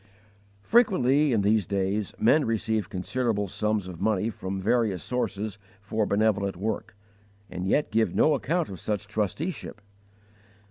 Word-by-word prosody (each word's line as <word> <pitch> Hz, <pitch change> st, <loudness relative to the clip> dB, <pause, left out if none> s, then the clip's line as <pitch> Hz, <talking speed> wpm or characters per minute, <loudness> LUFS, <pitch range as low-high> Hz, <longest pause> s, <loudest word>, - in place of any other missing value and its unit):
Frequently, 150 Hz, -, +3 dB
in 110 Hz, -4 st, +2 dB
these 105 Hz, -2 st, +2 dB
days, 100 Hz, +1 st, -1 dB
men 145 Hz, +7 st, +4 dB
receive 110 Hz, -2 st, -1 dB
considerable 105 Hz, +2 st, -1 dB
sums 105 Hz, 0 st, -1 dB
of 90 Hz, -3 st, -8 dB
money 110 Hz, +1 st, +1 dB
from 95 Hz, -1 st, -5 dB
various 105 Hz, -3 st, +1 dB
sources 110 Hz, -4 st, -3 dB, 0.2 s
for 105 Hz, +1 st, -1 dB
benevolent 100 Hz, -2 st, +1 dB
work, 105 Hz, +1 st, -3 dB, 0.6 s
and 90 Hz, +1 st, -4 dB
yet 145 Hz, +9 st, +1 dB
give 110 Hz, -5 st, +1 dB
no 155 Hz, -, +4 dB
account 160 Hz, +4 st, 0 dB
of 95 Hz, -3 st, -8 dB
such 105 Hz, +2 st, -2 dB
trusteeship. 110 Hz, -, -3 dB
110 Hz, 135 wpm, -27 LUFS, 100-120 Hz, 0.6 s, men